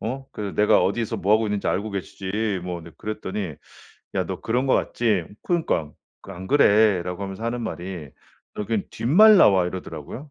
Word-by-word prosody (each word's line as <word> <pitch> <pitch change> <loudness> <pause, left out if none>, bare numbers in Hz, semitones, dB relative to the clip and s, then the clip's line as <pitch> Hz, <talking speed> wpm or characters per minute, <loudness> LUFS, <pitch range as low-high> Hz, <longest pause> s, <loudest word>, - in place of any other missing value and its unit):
어 130 +4 -4
그 100 -2 -5
내가 105 - +4
어디서 110 +3 -1
뭐 100 - +1
하고 110 0 +1
있는지 105 -1 -2
알고 105 +2 -1
계시지." 100 +1 -3
뭐 90 -2 -4
네 85 - -12
그랬더니 105 -5 -4 0.6
"야, - - 0
너 - - -5
그런 125 +4 0
것 130 - +3
같지?" 105 -8 0 0.2
그러니까 160 - -1 0.3
그 95 - -10
"안 95 +1 -8
그래."라고 100 -8 +3
하면서 95 +3 -6
하는 120 +1 -2
말이 90 -8 -6 0.5
"여긴 105 0 -1
뒷말 205 - +6
나와." 95 - +5
이러더라고요. 90 - -7
105 Hz, 350 characters per minute, -23 LUFS, 95-115 Hz, 0.6 s, 뒷말